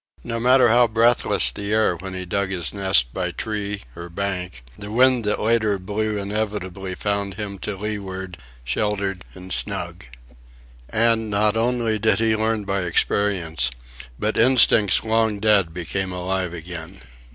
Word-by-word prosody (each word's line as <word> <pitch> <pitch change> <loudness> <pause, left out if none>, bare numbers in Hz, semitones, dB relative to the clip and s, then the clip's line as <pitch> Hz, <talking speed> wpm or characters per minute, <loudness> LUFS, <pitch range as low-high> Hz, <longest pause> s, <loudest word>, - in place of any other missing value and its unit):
No 115 -1 -3
matter 125 +1 +5
how 120 +1 +5
breathless 115 - +3
the 100 +8 -5
air 110 -4 +2
when 95 +2 -7
he 95 0 -5
dug 100 +2 -1
his 90 -4 -3
nest 95 -12 +2
by 90 -1 -2
tree 105 +1 -4
or 85 0 -8
bank, 90 -8 -4
the 105 0 -8
wind 125 0 +4
that 105 - 0
later 110 -2 +2
blew 105 +3 -2
inevitably 100 -2 -3
found 100 -1 -2
him 100 -2 -6
to 100 +2 -4
leeward, 95 -3 -5 0.2
sheltered 100 - -2
and 90 0 -7
snug. - - -3 0.8
And 115 0 +2
not 105 +1 +2
only 115 -1 +1
did 110 +1 +3
he 110 -1 +2
learn 110 -1 0
by 95 0 -1
experience, 90 -2 0 0.5
but - - -1
instincts 115 -4 +5
long 110 -2 +1
dead 100 -5 +3
became 90 +3 -3
alive 90 0 -2
again. 85 +2 -8
100 Hz, 150 wpm, -22 LUFS, 95-110 Hz, 0.8 s, matter